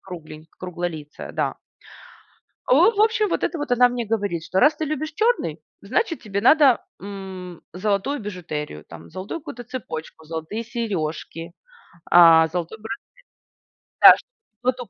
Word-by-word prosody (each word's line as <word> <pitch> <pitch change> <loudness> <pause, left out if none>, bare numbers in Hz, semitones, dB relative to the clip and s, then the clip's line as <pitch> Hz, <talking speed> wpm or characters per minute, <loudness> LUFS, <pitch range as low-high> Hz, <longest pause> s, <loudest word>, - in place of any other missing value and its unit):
кругленьк 160 -3 -10
круглолицая, 175 -4 -6
да. - - -2 1.1
Э, - - +3
у, - - +5
вот, 455 - +5
в - - +1
общем, 435 -1 +3
вот - - -1
это 340 - -2
вот, 290 -4 -3
она 245 0 +6
мне 245 -2 -3
говорит, 200 -7 -1
что: 185 - 0
"Раз 300 +1 +5
ты - - +1
любишь 310 +1 -3
черный, 470 +7 +1 0.3
значит 430 -8 -1
тебе 200 -2 -3
надо, 275 +2 +6 0.2
м, 190 -3 -8
золотую 210 +9 -1
бижутерию. 155 - -6
Там, 85 0 -12
золотую 195 - -6
какую-то 245 -6 -8
цепочку, 160 -10 -7
золотые 160 +8 -5
сережки, 170 -8 -4 0.6
а, 165 -2 +8
золотой 175 +5 -4 1.0
браслет. - - +7 0.4
Да, 255 - +4
чтоб 245 -3 -9
200 Hz, 145 wpm, -23 LUFS, 165-255 Hz, 1.1 s, а